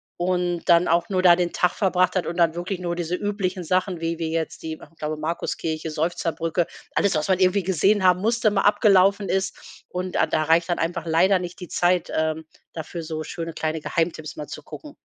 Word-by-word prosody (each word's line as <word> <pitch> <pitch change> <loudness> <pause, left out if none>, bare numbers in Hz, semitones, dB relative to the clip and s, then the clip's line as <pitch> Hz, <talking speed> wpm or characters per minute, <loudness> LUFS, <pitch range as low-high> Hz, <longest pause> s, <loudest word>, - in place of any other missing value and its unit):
und 175 -1 -1
dann 170 +1 +5
auch 170 +2 +2
nur 185 -1 0
da 175 -1 +8
den 175 -1 -1
Tag 180 - +2
verbracht 185 -2 +1
hat 185 - 0
und 170 - -4
dann 165 -2 +3
wirklich 180 +2 -4
nur 175 -1 -3
diese 175 0 -2
üblichen 195 -3 -2
Sachen, 185 +1 0
wie 165 0 -3
wie 160 -1 -2
jetzt 165 -1 -3
die, 160 0 -4
ich 165 - -17
glaube 155 0 -3
Markus-Kirche, 160 0 -3
Seufzerbrücke, 165 +1 -1 0.3
alles 200 -5 +2
was 155 +3 0
man 190 -1 +2
irgendwie 185 +1 +3
gesehen 190 +3 +2
haben 180 0 +4
musste, 225 -1 +2
mal 195 -1 +1
abgelaufen 200 -1 +4
ist, 190 0 -4
und 180 0 -4
a - - +3
da 155 - 0
reicht 165 +3 +2
dann 175 - 0
einfach 170 0 -2
leider 185 +4 +3
nicht 180 +1 -7
die 180 - -7
Zeit, 180 0 +1
ähm, 160 0 -1 0.3
dafür 165 +1 -6
so 155 0 -4
schöne 165 0 -6
kleine 155 -1 -2
Geheimtipps 160 -2 -2
mal 150 - -7
zu - - -8
gucken. 300 -2 -11
175 Hz, 210 wpm, -23 LUFS, 165-185 Hz, 0.3 s, da